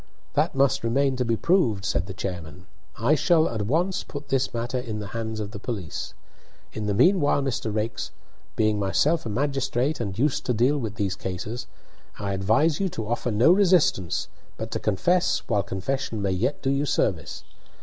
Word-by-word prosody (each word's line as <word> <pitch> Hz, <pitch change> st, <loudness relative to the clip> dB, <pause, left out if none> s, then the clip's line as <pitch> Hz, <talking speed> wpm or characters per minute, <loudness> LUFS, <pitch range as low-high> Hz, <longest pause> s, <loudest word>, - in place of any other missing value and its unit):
"That -, -, +1 dB
must 135 Hz, 0 st, +2 dB
remain 135 Hz, +3 st, +2 dB
to 125 Hz, -, +1 dB
be 115 Hz, -1 st, +1 dB
proved," 120 Hz, -, +2 dB
said 95 Hz, -1 st, 0 dB
the 95 Hz, -, -6 dB
chairman. 90 Hz, -2 st, -6 dB, 0.3 s
"I 120 Hz, +7 st, +3 dB
shall 160 Hz, +1 st, +4 dB
at 110 Hz, -2 st, -3 dB
once 175 Hz, -, +1 dB
put 145 Hz, 0 st, -8 dB
this 135 Hz, 0 st, +1 dB
matter 120 Hz, +2 st, -2 dB
in 115 Hz, -4 st, -4 dB
the 105 Hz, -1 st, -6 dB
hands 110 Hz, -1 st, -3 dB
of 105 Hz, -1 st, -4 dB
the 100 Hz, -, -7 dB
police. 100 Hz, -, -5 dB, 0.6 s
In 110 Hz, -1 st, -3 dB
the 100 Hz, -, 0 dB
meanwhile, 145 Hz, -, +4 dB
Mr. 130 Hz, -4 st, -2 dB
Raikes, 110 Hz, +2 st, -2 dB, 0.5 s
being 110 Hz, -1 st, +2 dB
myself 140 Hz, +10 st, +1 dB
a -, -, -3 dB
magistrate 135 Hz, +3 st, 0 dB
and 100 Hz, -5 st, -3 dB
used 140 Hz, +3 st, +1 dB
to 125 Hz, -, +2 dB
deal 130 Hz, +6 st, +3 dB
with 110 Hz, -5 st, -4 dB
these 100 Hz, -3 st, -1 dB
cases, 105 Hz, +6 st, -5 dB, 0.5 s
I 100 Hz, -1 st, -2 dB
advise 110 Hz, +12 st, +2 dB
you 195 Hz, -1 st, +1 dB
to 110 Hz, -9 st, -5 dB
offer 120 Hz, +1 st, -1 dB
no 115 Hz, +8 st, +5 dB
resistance 180 Hz, -, +3 dB, 0.3 s
but -, -, -5 dB
to -, -, -2 dB
confess 175 Hz, -, +1 dB
while 105 Hz, -4 st, +2 dB
confession 110 Hz, +5 st, -3 dB
may 100 Hz, -1 st, 0 dB
yet 110 Hz, +10 st, -1 dB
do 135 Hz, -, +2 dB
you 140 Hz, +1 st, 0 dB
service. 90 Hz, -, -1 dB
120 Hz, 185 wpm, -25 LUFS, 105-140 Hz, 0.6 s, no